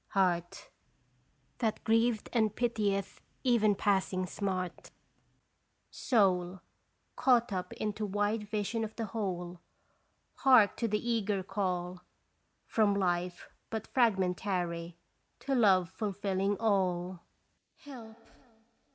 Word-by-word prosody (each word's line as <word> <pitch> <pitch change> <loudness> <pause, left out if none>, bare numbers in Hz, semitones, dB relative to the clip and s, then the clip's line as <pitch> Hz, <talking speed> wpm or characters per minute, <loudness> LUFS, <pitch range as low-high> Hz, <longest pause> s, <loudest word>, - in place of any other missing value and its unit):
Heart 175 -3 0 0.9
That 225 -3 -1
grieved 225 0 +2
and 220 -3 +2
pitieth 210 -5 -1 0.2
even 225 -5 +3
passing 190 -2 +1
smart 185 -2 -4 1.0
Soul 185 -5 +1 0.5
Caught 240 -4 +3
up 180 -1 -3
into 210 0 -3
wide 205 +2 -1
vision 215 +2 -1
of 220 0 -6
the 225 - -3
whole 180 -5 -4 0.8
Hark 250 -7 +5
to 230 - 0
the 210 +2 -2
eager 210 -4 0
call 180 -2 -3 0.6
From 210 -3 +2
life 180 -2 -1 0.2
but 220 -1 -6
fragmentary 180 -6 0 0.4
To 275 - -2
love 190 -8 +4
fulfilling 200 -1 -1
all: 185 -4 0 0.6
Help! 235 -6 -11
200 Hz, 100 wpm, -31 LUFS, 185-220 Hz, 1.0 s, Hark